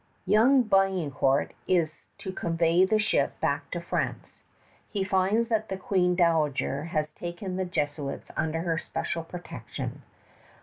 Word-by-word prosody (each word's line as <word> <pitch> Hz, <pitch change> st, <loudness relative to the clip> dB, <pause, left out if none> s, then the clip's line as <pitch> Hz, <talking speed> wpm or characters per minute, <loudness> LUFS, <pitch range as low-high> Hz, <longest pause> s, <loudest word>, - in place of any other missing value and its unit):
Young 250 Hz, +5 st, +5 dB
Biencourt 180 Hz, -, +2 dB, 0.2 s
is 165 Hz, -4 st, 0 dB
to 190 Hz, -, -5 dB
convey 170 Hz, +1 st, +3 dB
the 215 Hz, +3 st, +2 dB
ship 215 Hz, 0 st, +1 dB
back -, -, -1 dB
to -, -, -3 dB
France. -, -, -3 dB, 0.5 s
He 200 Hz, -2 st, -1 dB
finds 195 Hz, +4 st, +2 dB
that 220 Hz, -1 st, 0 dB
the 190 Hz, -, -2 dB
Queen 185 Hz, -2 st, +1 dB
Dowager 155 Hz, -4 st, +1 dB
has 155 Hz, -2 st, -1 dB
taken 175 Hz, +3 st, -5 dB
the 185 Hz, 0 st, -1 dB
Jesuits 145 Hz, -5 st, -3 dB
under 160 Hz, +1 st, -1 dB
her 165 Hz, -1 st, 0 dB
especial 165 Hz, 0 st, -3 dB
protection. 175 Hz, +2 st, -7 dB
175 Hz, 135 wpm, -28 LUFS, 160-195 Hz, 0.5 s, Young